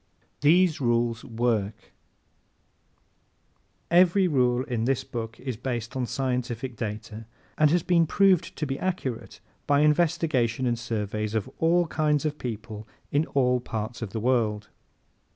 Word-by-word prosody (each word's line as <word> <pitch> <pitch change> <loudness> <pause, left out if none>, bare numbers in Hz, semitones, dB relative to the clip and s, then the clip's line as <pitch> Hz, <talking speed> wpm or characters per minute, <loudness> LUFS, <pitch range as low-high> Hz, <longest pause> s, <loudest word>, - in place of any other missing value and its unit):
These 160 +1 +4
Rules 120 -1 +1
Work 115 -3 -1
¶ - - -31 2.1
Every 180 +2 +5
rule 125 -5 +2
in 120 -5 -2
this 135 0 0
book 115 -1 -6
is 130 -4 -5
based 120 -2 -4
on 125 -2 -1
scientific 125 -1 -3
data, 110 0 -6 0.3
has 155 +2 +4
been 170 -2 +3
proved 195 0 +3
to 150 - -2
be 135 -1 -3
accurate 175 -11 -4 0.3
by 145 0 +4
investigations 150 -6 +2
and 120 -1 0
surveys 110 -1 -3
of 110 - -1
all 170 +2 +3
kinds 155 -2 0
of 150 -1 -2
people 110 -2 -6 0.2
in 150 +3 +1
all 125 -2 +3
parts 115 -1 -5
of 115 - -4
the 110 - -4
world. 110 -3 0
125 Hz, 135 wpm, -26 LUFS, 115-150 Hz, 2.1 s, Every